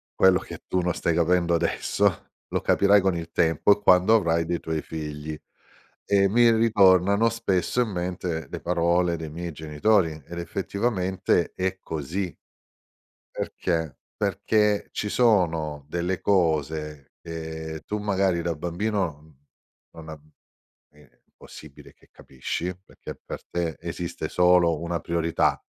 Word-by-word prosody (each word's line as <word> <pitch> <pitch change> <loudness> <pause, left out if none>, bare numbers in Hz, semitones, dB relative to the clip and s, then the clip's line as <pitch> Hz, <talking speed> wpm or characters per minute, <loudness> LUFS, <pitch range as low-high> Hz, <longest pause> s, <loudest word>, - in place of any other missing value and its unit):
quello 95 -1 +5
che - - -10
tu 95 - 0
non 90 -1 0
stai 85 - 0
capendo 85 +1 +2
adesso, 85 0 0 0.2
lo - - -2
capirai 100 0 +4
con 95 -2 +1
il 85 0 -6
tempo 85 +5 +3
e - - -19
quando 95 +4 +5
avrai 85 -5 +2
dei 85 0 -2
tuoi 80 -1 -3
figli." 75 -1 -6 0.7
E 100 -1 +3
mi 120 +3 +5
ritornano 100 -2 +4
spesso 115 -1 0
in 110 - -3
mente 90 -4 -3
le - - -6
parole 85 0 +1
dei 80 -2 -7
miei 85 +1 -6
genitori, 80 +5 +1 0.2
ed 85 - -7
effettivamente, 95 0 -1
è 95 0 -2
così, 80 +4 -4 0.9
perché? 80 -5 -3 0.2
Perché 105 -2 +1
ci 105 - -3
sono 80 - +1
delle 85 +3 -2
cose, 80 -5 0
che 80 -1 -6
tu 105 - -2
magari 95 -4 0
da 85 -1 -1
bambino, 85 -1 -2
mhmm, 75 -3 -21 0.6
non 80 -1 -12
uhm, 75 -1 -11 0.6
è 75 -4 -23
impossibile 75 -3 -14
che - - -27
capisci, 85 +7 -5
perché - - -10
per - - -8
te 85 -2 -3
esiste 85 +1 -5
solo 90 -2 +4
1 85 -1 -3
priorità, 85 0 0
85 Hz, 135 wpm, -25 LUFS, 80-95 Hz, 0.9 s, quello